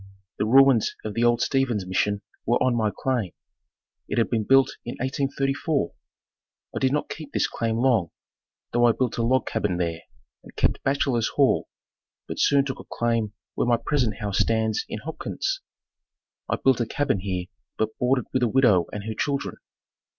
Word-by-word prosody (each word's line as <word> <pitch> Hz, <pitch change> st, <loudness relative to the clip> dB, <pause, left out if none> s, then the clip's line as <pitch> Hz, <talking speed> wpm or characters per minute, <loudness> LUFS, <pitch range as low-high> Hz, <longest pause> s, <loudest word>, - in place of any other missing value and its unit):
The 105 Hz, -, +1 dB
ruins 135 Hz, -1 st, +5 dB
of 105 Hz, -, -3 dB
the 115 Hz, -, 0 dB
old 120 Hz, 0 st, +3 dB
Steven's 125 Hz, -8 st, 0 dB
Mission 100 Hz, +2 st, 0 dB, 0.2 s
were 120 Hz, +2 st, +2 dB
on 130 Hz, -1 st, +2 dB
my 110 Hz, -2 st, +1 dB
claim. 110 Hz, -2 st, -2 dB, 0.7 s
It -, -, -3 dB
had 115 Hz, -, +2 dB
been 110 Hz, -3 st, 0 dB
built 135 Hz, +2 st, +5 dB
in 120 Hz, -, -5 dB
1834. 135 Hz, +2 st, -1 dB, 0.8 s
I -, -, -1 dB
did 130 Hz, -1 st, +2 dB
not 150 Hz, +1 st, 0 dB
keep 155 Hz, -3 st, -8 dB
this -, -, +1 dB
claim 115 Hz, -1 st, -2 dB
long, 115 Hz, -8 st, +2 dB, 0.6 s
though 120 Hz, 0 st, +4 dB
I 115 Hz, -, +4 dB
built 125 Hz, -1 st, -1 dB
a -, -, +2 dB
log 130 Hz, +3 st, +2 dB
cabin 105 Hz, -5 st, -1 dB
there 85 Hz, -2 st, -2 dB, 0.4 s
and -, -, -16 dB
kept -, -, +1 dB
bachelor's 135 Hz, -4 st, +1 dB
hall, -, -, +2 dB, 0.6 s
but -, -, -5 dB
soon 140 Hz, -1 st, +4 dB
took 135 Hz, -2 st, -4 dB
a -, -, -8 dB
claim 115 Hz, -3 st, 0 dB, 0.2 s
where -, -, -1 dB
my 120 Hz, -1 st, +4 dB
present 120 Hz, -3 st, 0 dB
house 100 Hz, -3 st, -2 dB
stands 110 Hz, -1 st, +1 dB
in -, -, -4 dB
Hopkins. -, -, -3 dB, 0.9 s
I -, -, +2 dB
built 130 Hz, -2 st, +2 dB
a 115 Hz, -, -1 dB
cabin 145 Hz, -7 st, 0 dB
here 90 Hz, -2 st, -3 dB, 0.3 s
but 110 Hz, 0 st, -1 dB
boarded 125 Hz, -1 st, +2 dB
with 130 Hz, -, +1 dB
a 120 Hz, -, +3 dB
widow 110 Hz, -8 st, +4 dB
and 105 Hz, -, -5 dB
her 110 Hz, +1 st, -4 dB
children. 140 Hz, +5 st, -2 dB
120 Hz, 180 wpm, -25 LUFS, 110-135 Hz, 0.9 s, ruins